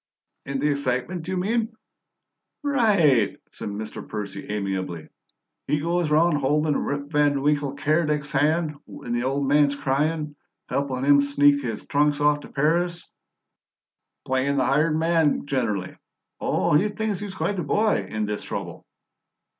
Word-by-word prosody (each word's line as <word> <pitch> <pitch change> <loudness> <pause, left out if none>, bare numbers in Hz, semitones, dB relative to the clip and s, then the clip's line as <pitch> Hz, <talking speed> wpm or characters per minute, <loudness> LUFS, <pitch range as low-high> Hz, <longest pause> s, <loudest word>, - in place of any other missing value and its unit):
"In 140 0 -2
the 150 - +2
excitement, 140 +5 -2
you 185 0 -2
mean?" 225 +4 -1 0.9
"Right!" 200 - +3
said - - -6
Mr. 105 +1 -7
Percy 105 -3 -6
amiably. 95 -5 -3 0.6
"He 150 - +1
goes 170 +1 0
round 155 0 +3
holdin' 150 +2 +1
Rip 145 +1 -3
Van 145 -2 +2
Winkle 145 -1 +1
Keredec's 150 0 0
hand 150 +2 +1
when 120 - -6
the 120 - 0
ole 135 +2 0
man's 145 +1 +3
cryin'; 150 +2 -1 0.3
helpin' 135 -2 -2
him 140 0 +6
sneak 145 0 +3
his 115 -5 -5
trunks 145 0 +1
off 145 0 +3
t' - - -11
Paris 170 +4 0 1.2
playin' 130 +2 0
the 130 - +2
hired 150 +3 +2
man 160 -3 +2
gener'ly. 115 -10 -2 0.4
Oh, - - +1
he 200 +8 +3
thinks 210 -2 -2
he's 200 -2 -6
quite 200 +1 -1
the 175 - -1
boy, 210 +8 +1
in 110 0 -2
this 105 0 -3
trouble!" - - -6
145 Hz, 145 wpm, -24 LUFS, 135-165 Hz, 1.2 s, him